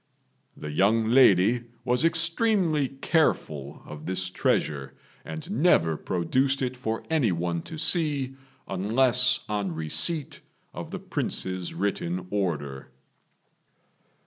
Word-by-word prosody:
The 75 - -6
young 110 +7 +2
lady 120 -1 +5 0.2
was 125 +4 +1
extremely 165 - +2
careful 80 - -1
of 75 0 -9
this 95 0 -2
treasure, 70 -6 -1 0.3
and 160 +4 -7
never 85 - +3
produced 130 - 0
it 125 0 -2
for 115 -3 -3
any 140 -10 +2
one 85 0 -2
to 160 - -9
see 150 -5 +1 0.3
unless 125 +6 +2
on 100 -5 -2
receipt 135 - 0 0.3
of - - -7
the - - -5
Prince's 95 -2 -3
written 90 -1 -2
order. 75 -10 -3
110 Hz, 110 wpm, -26 LUFS, 85-140 Hz, 0.3 s, lady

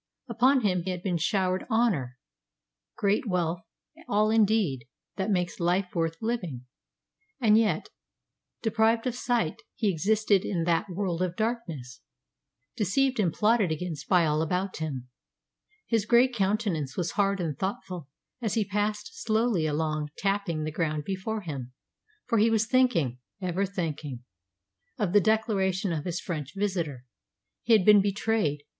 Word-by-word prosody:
Upon 255 +3 +3
him 185 -5 +1
had 180 -2 -3
been 180 -3 0
showered 185 +3 0
honour, 190 - +1 0.8
great 210 +2 +1
wealth, 175 -3 0 0.5
all 210 +1 +2
indeed 205 - +2 0.3
that 190 +1 -1
makes 180 -3 0
life 180 +2 +1
worth 165 -1 0
living, 180 - -3 0.7
and 220 -4 +5
yet, 215 -8 +2 0.7
deprived 225 +1 +2
of 250 - 0
sight, 240 -8 -1
he 210 -4 +1
existed 205 +3 +2
in 175 -6 -1
that 170 +4 +1
world 180 -2 -2
of 180 -2 -1
darkness, 180 - -3 0.7
deceived 255 +5 +1
and 180 -5 +2
plotted 210 -1 +2
against 155 -2 -4
by 180 -3 +5
all 150 0 +1
about 180 +4 -1
him. 140 -6 -4 0.8
His 225 -3 0
grey 240 +2 +6
countenance 195 - -1
was 175 -1 -1
hard 200 -1 +1
and 160 -5 -2
thoughtful 185 -5 -4 0.3
as 220 -4 -1
he 220 -2 +1
passed 210 - -2
slowly 220 -7 +1
along 155 0 -1
tapping 195 -5 -1
the 155 - -3
ground 155 -2 -1
before 195 +5 -3
him, 135 -8 -6 0.5
for 230 -3 +1
he 220 +2 +5
was 220 -1 +2
thinking 215 - +2 0.2
ever 185 +1 -1
thinking 155 -9 -4 0.7
of 195 -4 -1
the 205 - +6
declaration 195 -4 +1
of 155 -2 -3
his 175 -1 -2
French 150 -6 -5
visitor. 170 -11 -2 0.6
He 230 - +2
had 210 -5 +5
been 210 -1 +8
betrayed. 200 -7 0
190 Hz, 145 wpm, -28 LUFS, 165-215 Hz, 0.8 s, been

